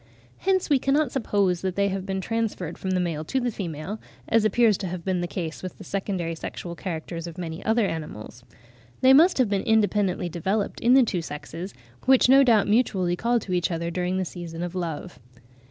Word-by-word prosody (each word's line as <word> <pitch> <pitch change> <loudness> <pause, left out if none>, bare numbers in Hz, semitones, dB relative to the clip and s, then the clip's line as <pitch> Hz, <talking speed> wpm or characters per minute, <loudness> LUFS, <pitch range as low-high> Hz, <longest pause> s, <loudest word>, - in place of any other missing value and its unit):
Hence 380 -1 +1
we 285 -3 +3
cannot 275 +1 +1
suppose 200 -8 +1
that 185 -2 -2
they 200 0 +2
have 190 0 -4
been 190 0 -2
transferred 215 -6 -2
from 190 - -4
the 185 -1 +1
male 165 -4 -2
to 265 - 0
the 245 -1 -1
female, 180 +1 -5 0.3
as 225 -1 +3
appears 215 0 +4
to 190 - -3
have 175 -1 -6
been 185 -2 0
the 175 - -2
case 170 -3 -5
with 185 - -7
the - - -10
secondary 190 -4 -3
sexual 170 +1 -6
characters 170 -1 -5
of 170 0 -9
many 165 -1 -5
other 225 0 +2
animals. 130 - -6 0.6
They 260 +1 +7
must 330 +7 +6
have 255 -3 +3
been 200 -1 0
independently 205 -4 +1
developed 190 +5 -2
in 245 +2 +4
the 265 - +7
two 185 -6 -1
sexes, 165 +4 -7 0.3
which 260 -1 +5
no 270 +1 +8
doubt 225 -6 +4
mutually 195 -5 +2
call 235 +6 +1
to 185 - -5
each 175 -1 +1
other 170 0 -2
during 180 +1 -1
the 190 - -1
season 170 -1 -6
of 175 0 -4
love. 175 -1 -5
190 Hz, 205 wpm, -25 LUFS, 170-220 Hz, 0.6 s, no